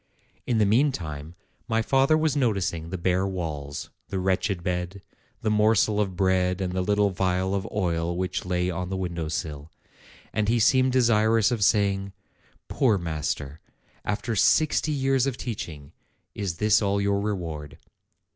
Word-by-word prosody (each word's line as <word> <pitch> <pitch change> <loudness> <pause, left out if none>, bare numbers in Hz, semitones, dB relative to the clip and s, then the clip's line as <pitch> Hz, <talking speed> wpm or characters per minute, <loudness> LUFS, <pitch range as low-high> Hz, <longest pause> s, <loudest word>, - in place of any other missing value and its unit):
In 120 - +1
the 110 - +4
meantime, 90 - 0 0.3
my 115 0 +1
father 135 +5 +3
was 155 -2 +1
noticing 100 - 0
the 95 - -4
bare 90 +2 +1
walls, 75 -7 -5 0.2
the 95 - -3
wretched 95 0 0
bed, 90 +2 -3 0.4
the 110 - +1
morsel 105 -1 +3
of 95 -3 -2
bread 90 0 +1
and 90 -2 -2
the 95 - 0
little 105 +1 +2
phial 95 +1 0
of 100 -1 -2
oil 85 -4 -1
which 95 0 -2
lay 90 0 -1
on 90 +1 -4
the 95 - -2
window 85 -3 -3
sill; 75 -1 -5 0.6
and 105 -1 0
he 120 - +3
seemed 130 +3 +4
desirous 115 -3 +3
of 115 -4 0
saying, 100 -2 +2 0.5
"Poor 120 -7 +2
master! 75 -3 -3 0.4
after 105 +3 -2
sixty 155 - +3
years 135 -2 +1
of 130 -3 -2
teaching, 80 - -6 0.4
is 95 -5 -3
this 105 +2 +3
all 100 -1 +1
your 100 0 +1
reward?" 85 -8 -4
95 Hz, 155 wpm, -26 LUFS, 90-110 Hz, 0.6 s, the